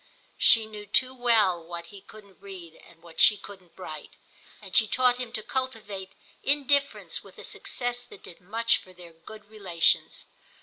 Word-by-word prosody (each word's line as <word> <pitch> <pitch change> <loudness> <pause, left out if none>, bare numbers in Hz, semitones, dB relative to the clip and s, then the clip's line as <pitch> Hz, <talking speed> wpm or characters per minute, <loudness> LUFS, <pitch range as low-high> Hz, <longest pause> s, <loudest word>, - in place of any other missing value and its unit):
She 225 -1 +6
knew 210 -1 -10
too 255 +5 +2
well 220 -9 +2
what 170 0 -7
he 200 - -11
couldn't 200 -1 -16
read 185 -5 -10
and 165 0 -20
what 165 -1 -5
she 210 - +7
couldn't 190 -3 -13
write, 155 -5 -9 0.4
and 195 -3 -10
she 220 - +6
taught 250 +2 +3
him 250 -2 -5
to 215 - -2
cultivate 210 -8 -4 0.3
indifference 280 0 +1
with - - -15
a - - -10
success 245 -1 -1
that 225 - -15
did 170 - -13
much 225 +5 +2
for 185 - -15
their 175 -2 -14
good 210 +6 -13
relations. 195 -6 +1
205 Hz, 170 wpm, -27 LUFS, 180-235 Hz, 0.4 s, she